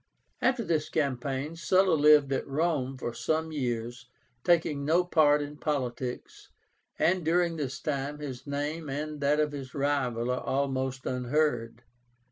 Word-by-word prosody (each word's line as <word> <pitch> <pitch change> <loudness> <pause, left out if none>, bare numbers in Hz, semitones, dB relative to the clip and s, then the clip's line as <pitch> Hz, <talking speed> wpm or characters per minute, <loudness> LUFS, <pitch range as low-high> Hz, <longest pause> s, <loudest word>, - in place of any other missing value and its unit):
After 255 -2 +2
this 155 -6 0
campaign 140 +1 -2
Sulla 185 +3 +3
lived 150 -2 +5
at - - -2
Rome 140 -3 0
for 120 -2 -4
some 160 +4 -1
years, 120 -3 -3 0.4
taking 160 -4 +2
no 165 +5 +3
part 150 -4 +4
in 145 +1 -8
politics, 130 -5 -4 0.5
and 180 +1 +2
during 170 +1 +2
this 140 -4 -4
time 145 0 -3
his 135 -4 -7
name 145 +2 -3
and 150 +2 -4
that 145 +2 +2
of 150 -1 +1
his 135 -3 -7
rival 130 -4 0
are 125 - -1
almost 130 -1 -1
unheard. 125 -2 -1
145 Hz, 140 wpm, -29 LUFS, 130-155 Hz, 0.5 s, lived